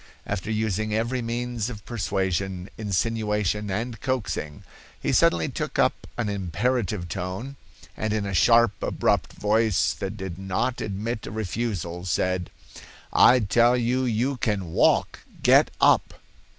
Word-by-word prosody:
After 100 Hz, +1 st, -3 dB
using 110 Hz, -1 st, -1 dB
every 120 Hz, +3 st, -1 dB
means 120 Hz, -1 st, -3 dB
of 105 Hz, -4 st, -9 dB
persuasion, 95 Hz, -4 st, -2 dB
insinuation 105 Hz, 0 st, -1 dB
and 110 Hz, +3 st, -3 dB
coaxing, 115 Hz, -, -3 dB, 0.4 s
he -, -, -1 dB
suddenly 85 Hz, -2 st, +3 dB
took -, -, -4 dB
up -, -, +1 dB
an 120 Hz, -3 st, -1 dB
imperative 100 Hz, -, -1 dB
tone, 95 Hz, +9 st, -5 dB, 0.4 s
and 110 Hz, -, -2 dB
in 105 Hz, -1 st, -1 dB
a 100 Hz, -, -3 dB
sharp, 115 Hz, +5 st, +5 dB
abrupt -, -, 0 dB
voice 110 Hz, -1 st, +2 dB
that 100 Hz, +2 st, -5 dB
did 95 Hz, -3 st, -6 dB
not 95 Hz, +6 st, -1 dB
admit 110 Hz, +3 st, -4 dB
a -, -, -6 dB
refusal, 100 Hz, -4 st, -3 dB
said: 90 Hz, +2 st, 0 dB, 0.6 s
'I 125 Hz, 0 st, +6 dB
tell 120 Hz, +4 st, +4 dB
you 125 Hz, +2 st, +1 dB
you 125 Hz, +3 st, 0 dB
can 100 Hz, -8 st, -2 dB
walk; -, -, +2 dB, 0.2 s
get -, -, +6 dB
up. -, -, +4 dB
105 Hz, 135 wpm, -25 LUFS, 95-115 Hz, 0.6 s, I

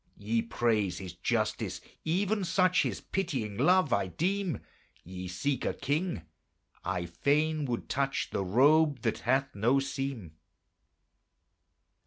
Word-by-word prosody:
Ye 110 Hz, +3 st, 0 dB
praise 110 Hz, -5 st, 0 dB
His 90 Hz, -2 st, -7 dB
justice; 110 Hz, +5 st, -1 dB, 0.2 s
even 195 Hz, +5 st, +1 dB
such 185 Hz, 0 st, +3 dB
His -, -, -2 dB
pitying 130 Hz, -, -2 dB
love 155 Hz, -, +4 dB
I 100 Hz, -1 st, +1 dB
deem: 185 Hz, -, -1 dB, 0.4 s
Ye 90 Hz, +1 st, -7 dB
seek 110 Hz, +11 st, -1 dB
a -, -, -1 dB
king; 145 Hz, -, -1 dB, 0.6 s
I 85 Hz, -, -2 dB
fain 150 Hz, -, +1 dB
would 120 Hz, -3 st, -3 dB
touch 135 Hz, +1 st, -1 dB
The 100 Hz, -, -1 dB
robe 140 Hz, -, +4 dB
that -, -, -1 dB
hath 135 Hz, +3 st, +1 dB
no 120 Hz, +7 st, +3 dB
seam. 135 Hz, -, -4 dB
135 Hz, 125 wpm, -30 LUFS, 105-155 Hz, 0.6 s, love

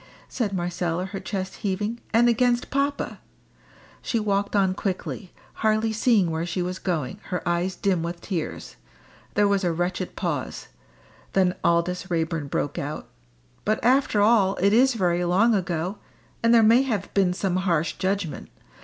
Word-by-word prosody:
said 225 Hz, -6 st, -2 dB
Marcella, 175 Hz, -1 st, -2 dB
her 195 Hz, +1 st, -6 dB
chest 190 Hz, -2 st, -4 dB
heaving; 210 Hz, +3 st, -2 dB
"and 235 Hz, +1 st, +5 dB
against 240 Hz, +1 st, +2 dB
papa." 280 Hz, +1 st, -1 dB, 0.8 s
She 230 Hz, -, -1 dB
walked 200 Hz, -1 st, 0 dB
on 190 Hz, -2 st, +3 dB
quickly, 190 Hz, 0 st, -4 dB, 0.3 s
hardly 220 Hz, 0 st, +2 dB
seeing 215 Hz, -6 st, +3 dB
where 160 Hz, +1 st, -2 dB
she 175 Hz, +1 st, -2 dB
was 180 Hz, +1 st, -4 dB
going, 165 Hz, -1 st, -2 dB
her 180 Hz, -1 st, -4 dB
eyes 175 Hz, +2 st, 0 dB
dim 185 Hz, -3 st, 0 dB
with 170 Hz, +1 st, -4 dB
tears. 150 Hz, -, -5 dB, 0.6 s
There 205 Hz, 0 st, +4 dB
was 200 Hz, -1 st, +1 dB
a 175 Hz, -, +2 dB
wretched 175 Hz, +2 st, -2 dB
pause. 160 Hz, -8 st, -3 dB, 0.6 s
Then 185 Hz, -2 st, +3 dB
Aldous 180 Hz, +2 st, +1 dB
Raeburn 165 Hz, -3 st, -1 dB
broke 145 Hz, +1 st, -2 dB
out 145 Hz, +2 st, -5 dB, 0.5 s
"But 215 Hz, +1 st, +1 dB
after 250 Hz, -3 st, +3 dB
all 205 Hz, -3 st, +4 dB
it 200 Hz, +2 st, +2 dB
is 255 Hz, +2 st, +4 dB
very 180 Hz, -4 st, +1 dB
long 195 Hz, +7 st, +3 dB
ago. 180 Hz, 0 st, -2 dB, 0.4 s
And 230 Hz, -, +3 dB
there 230 Hz, -1 st, +6 dB
may 230 Hz, +4 st, +6 dB
have 225 Hz, -8 st, -2 dB
been 195 Hz, -3 st, +3 dB
some 185 Hz, 0 st, -1 dB
harsh 170 Hz, -4 st, +1 dB
judgment. 190 Hz, -4 st, -2 dB
190 Hz, 155 wpm, -25 LUFS, 175-215 Hz, 0.8 s, there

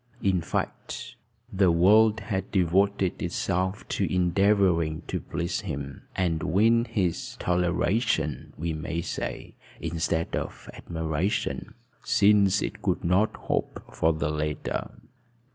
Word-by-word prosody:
In 95 Hz, -3 st, +2 dB
fact, 80 Hz, -, -4 dB, 0.4 s
the 95 Hz, -2 st, +4 dB
world 105 Hz, +6 st, +5 dB
had 100 Hz, -2 st, -3 dB
devoted 95 Hz, +1 st, +1 dB
itself 95 Hz, +3 st, -1 dB
to -, -, -1 dB
endeavoring 90 Hz, -3 st, +2 dB
to -, -, -3 dB
please 85 Hz, 0 st, -3 dB
him, 70 Hz, 0 st, -6 dB
and 85 Hz, -4 st, 0 dB
win 115 Hz, +7 st, +3 dB
his 90 Hz, -8 st, -2 dB
toleration, 90 Hz, -, 0 dB
we 80 Hz, +1 st, -2 dB
may 80 Hz, +2 st, -3 dB
say, -, -, -5 dB, 0.3 s
instead 80 Hz, 0 st, -1 dB
of -, -, -5 dB
admiration, 80 Hz, +3 st, -2 dB, 0.3 s
since 100 Hz, -1 st, +4 dB
it -, -, -5 dB
could -, -, 0 dB
not 95 Hz, +6 st, +2 dB
hope -, -, -3 dB
for 80 Hz, -, +2 dB
the 75 Hz, -1 st, -1 dB
latter. 75 Hz, -1 st, -2 dB
90 Hz, 115 wpm, -27 LUFS, 80-100 Hz, 0.4 s, world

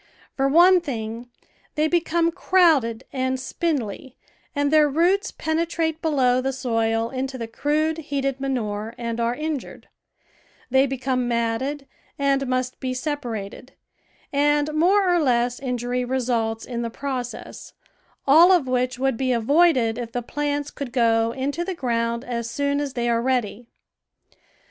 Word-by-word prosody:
For 270 Hz, 0 st, +1 dB
one 350 Hz, +5 st, +6 dB
thing, 235 Hz, -4 st, -5 dB, 0.5 s
they 305 Hz, +1 st, +2 dB
become 335 Hz, 0 st, +1 dB
crowded 305 Hz, -11 st, +3 dB
and 260 Hz, -1 st, -1 dB
sj^indly 260 Hz, -, -3 dB, 0.4 s
and 285 Hz, 0 st, +1 dB
their 305 Hz, -1 st, +5 dB
roots 360 Hz, +8 st, +2 dB
penetrate 320 Hz, 0 st, -1 dB
below 260 Hz, -6 st, +2 dB
the 265 Hz, +1 st, -1 dB
soil 225 Hz, -3 st, -1 dB
into 265 Hz, 0 st, -3 dB
the 230 Hz, -2 st, -5 dB
crude, 305 Hz, +7 st, 0 dB
heated 275 Hz, -3 st, -2 dB
manure 225 Hz, -5 st, -3 dB
and 235 Hz, -1 st, -4 dB
are 235 Hz, +1 st, 0 dB
injured; 305 Hz, -2 st, -5 dB, 0.8 s
they 265 Hz, +1 st, +4 dB
be 270 Hz, 0 st, -3 dB
come 255 Hz, -1 st, -1 dB
matted 240 Hz, +5 st, -1 dB, 0.3 s
and 275 Hz, -1 st, +1 dB
must 255 Hz, 0 st, -2 dB
be 255 Hz, -1 st, -3 dB
separated, 250 Hz, -4 st, -5 dB, 0.6 s
and 295 Hz, +1 st, +2 dB
more 375 Hz, +5 st, +3 dB
or 350 Hz, -1 st, +3 dB
less 245 Hz, -4 st, +1 dB
injury 250 Hz, -1 st, -2 dB
results 240 Hz, -3 st, -1 dB
in 235 Hz, -2 st, -4 dB
the 235 Hz, -, -2 dB
process, 255 Hz, -1 st, -6 dB, 0.5 s
all 325 Hz, +6 st, +7 dB
of 350 Hz, -7 st, +4 dB
which 255 Hz, 0 st, 0 dB
would 265 Hz, -2 st, 0 dB
be 260 Hz, 0 st, 0 dB
avoided 250 Hz, -1 st, +3 dB
if 230 Hz, -1 st, -6 dB
the 245 Hz, -, -2 dB
plants 290 Hz, +2 st, -2 dB
could 275 Hz, -4 st, -6 dB
go 230 Hz, -2 st, +2 dB
into 280 Hz, +7 st, -2 dB
the 375 Hz, +1 st, -4 dB
ground 235 Hz, -4 st, -1 dB
as 235 Hz, -2 st, -3 dB
soon 280 Hz, +3 st, -1 dB
as 280 Hz, -2 st, -4 dB
they 240 Hz, -3 st, -1 dB
are 230 Hz, -1 st, +2 dB
ready. 245 Hz, -2 st, -1 dB
260 Hz, 145 wpm, -23 LUFS, 235-295 Hz, 0.8 s, all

